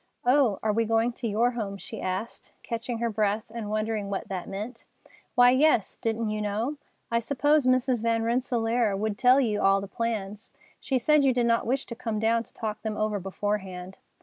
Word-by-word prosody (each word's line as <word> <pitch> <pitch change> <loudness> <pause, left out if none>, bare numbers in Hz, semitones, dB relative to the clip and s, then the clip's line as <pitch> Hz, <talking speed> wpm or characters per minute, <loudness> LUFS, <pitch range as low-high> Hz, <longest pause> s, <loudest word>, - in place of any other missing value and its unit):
"Oh, 250 -5 +4
are 215 -1 +2
we 225 +1 +1
going 225 +2 +1
to 235 - -4
your 230 +3 +2
home?" 210 -5 -4
she - - -8
asked, 185 +5 -4
catching 235 +1 -4
her 235 0 -1
breath 210 +1 -1
and 225 -3 -5
wondering 215 -1 -2
what 195 - -4
that 185 -3 -4
meant. 215 +5 -6 0.5
"Why, 245 0 +7
yes, 260 -5 +3
didn't 225 -1 -1
you 215 0 -2
know? 220 +8 -2 0.3
I 230 - +3
supposed 285 +3 +2
Mrs. 255 -2 +2
Van 230 0 +1
Rensselaer 230 -3 +1
would 215 +1 -1
tell 250 +5 +5
you 215 -6 +1
all 195 0 +4
the 200 - -6
plans. 210 -1 -4 0.3
She 265 - 0
said 300 +4 +4
you 265 -2 +3
did 245 -1 +2
not 230 -1 +2
wish 265 +2 0
to - - -7
come 225 -1 -3
down 225 +2 +2
to - - -13
talk 215 -2 -4
them 215 -1 -3
over 215 -1 0
beforehand." 190 -1 -4
225 Hz, 200 wpm, -27 LUFS, 210-245 Hz, 0.5 s, Why